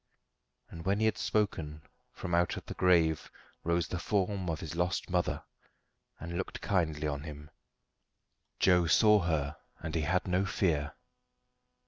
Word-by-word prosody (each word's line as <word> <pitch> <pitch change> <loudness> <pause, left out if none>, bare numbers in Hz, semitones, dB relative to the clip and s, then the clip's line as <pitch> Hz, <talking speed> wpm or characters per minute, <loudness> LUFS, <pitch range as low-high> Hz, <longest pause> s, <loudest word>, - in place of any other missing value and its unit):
And 85 - -8
when 100 +3 +1
he 110 - +2
had 110 - +1
spoken, 80 -8 -1 0.3
from 85 - -6
out 85 0 +2
the - - -6
grave 85 -4 +3 0.3
rose 85 -1 +1
the 90 - -3
form 95 -1 0
of 80 -1 -2
his 80 - -6
lost 90 +1 -1
mother, 90 -1 0 0.8
and 85 +1 -4
looked 95 - -4
kindly 80 -7 0
on 70 -1 -2
him. 75 0 -9 1.1
Joe 90 -2 +4
saw 105 +6 +6
her, 80 -3 -1 0.2
and 80 -1 -6
he 80 - +1
had 85 +5 0
no 90 +1 +2
fear. 80 -6 0
85 Hz, 145 wpm, -31 LUFS, 80-90 Hz, 1.1 s, saw